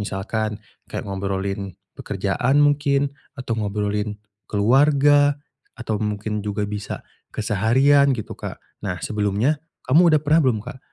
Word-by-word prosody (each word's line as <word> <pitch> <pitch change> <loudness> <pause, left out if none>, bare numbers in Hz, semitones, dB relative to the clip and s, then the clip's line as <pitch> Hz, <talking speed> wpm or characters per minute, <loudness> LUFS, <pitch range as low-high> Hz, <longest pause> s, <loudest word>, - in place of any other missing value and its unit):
Misalkan, 105 +2 -3 0.3
kayak - - -5
ngobrolin 95 -1 -3 0.2
pekerjaan 105 +7 -1
mungkin 145 -1 +2 0.2
atau 125 -3 -4
ngobrolin 105 0 -2 0.3
keluarga 145 +6 +4 0.4
atau 115 -4 -3
mungkin 105 0 -2
juga 105 0 -2
bisa 105 0 -5 0.2
keseharian 130 +7 +3
gitu 110 - -6
Kak. - - -7 0.2
Nah, 95 -4 -3
sebelumnya 105 +8 0 0.2
kamu 165 +7 +5
udah 150 - +4
pernah 155 +3 +4
belum 110 -3 +1
Kak, - - -8
110 Hz, 120 wpm, -22 LUFS, 100-140 Hz, 0.4 s, kamu